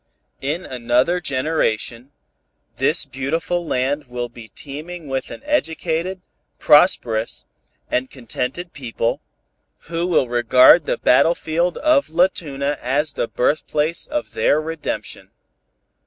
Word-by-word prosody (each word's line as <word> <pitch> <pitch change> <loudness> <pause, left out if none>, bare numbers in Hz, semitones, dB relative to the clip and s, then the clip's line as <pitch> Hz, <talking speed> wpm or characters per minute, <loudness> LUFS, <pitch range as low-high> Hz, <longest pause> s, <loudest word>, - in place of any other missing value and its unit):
In 155 +7 -2
another 125 +7 +1
generation, 130 -4 -1 0.7
this - - +3
beautiful 165 +6 -2
land 140 +3 -1
will 120 0 -4
be 115 -2 -12
teeming 155 +6 -8
with 135 -1 -3
an - - -9
educated, 180 - -1 0.4
prosperous 120 -8 +3 0.4
and 130 +1 -1
contented 130 +7 -5
people, 115 -4 -2 0.7
who 170 +1 -1
will 170 -7 +2
regard 125 +6 +5
the - - 0
battlefield 165 +5 +2
of 305 -2 +2
La 170 +3 +4
Tuna 140 -4 -4
as 140 +4 0
the - - -2
birthplace 155 +4 0
of 300 0 -4
their 150 - +2
redemption. 155 -1 -5
145 Hz, 110 wpm, -20 LUFS, 125-170 Hz, 0.7 s, regard